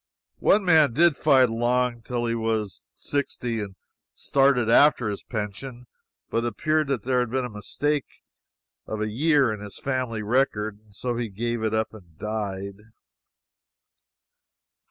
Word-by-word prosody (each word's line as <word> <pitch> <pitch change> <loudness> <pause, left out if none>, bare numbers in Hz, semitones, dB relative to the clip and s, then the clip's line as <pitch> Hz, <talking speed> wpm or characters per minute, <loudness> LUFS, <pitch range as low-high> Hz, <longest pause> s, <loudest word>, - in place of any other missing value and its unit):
One 200 -1 +3
man 155 -8 +5
did 165 +3 +4
fight 135 -5 +4
along 120 +1 0
till 120 +1 -3
he 115 - 0
was 110 -4 -2
sixty, 125 -5 -3
and 100 -2 -6 0.4
started 135 -4 +2
after 125 -1 +5
his 100 - -4
pension, 120 +3 -6 0.5
but 115 - 0
it - - 0
appeared 155 +7 0
that 135 -7 -1
there 125 0 +1
had 125 -2 0
been 130 +1 -1
a 125 - -7
mistake 140 +7 -2 0.8
of 110 - -4
a 105 0 -2
year 140 -1 +3
in 105 - -7
his 105 -1 -8
family 130 -5 -2
record, 110 -3 0
and 105 -2 -21
so 120 +1 -3
he 120 -2 -2
gave 115 +3 -3
it 110 0 0
up 110 0 -1
and 90 -7 -15
died. 100 -1 -4
120 Hz, 155 wpm, -25 LUFS, 110-130 Hz, 0.8 s, man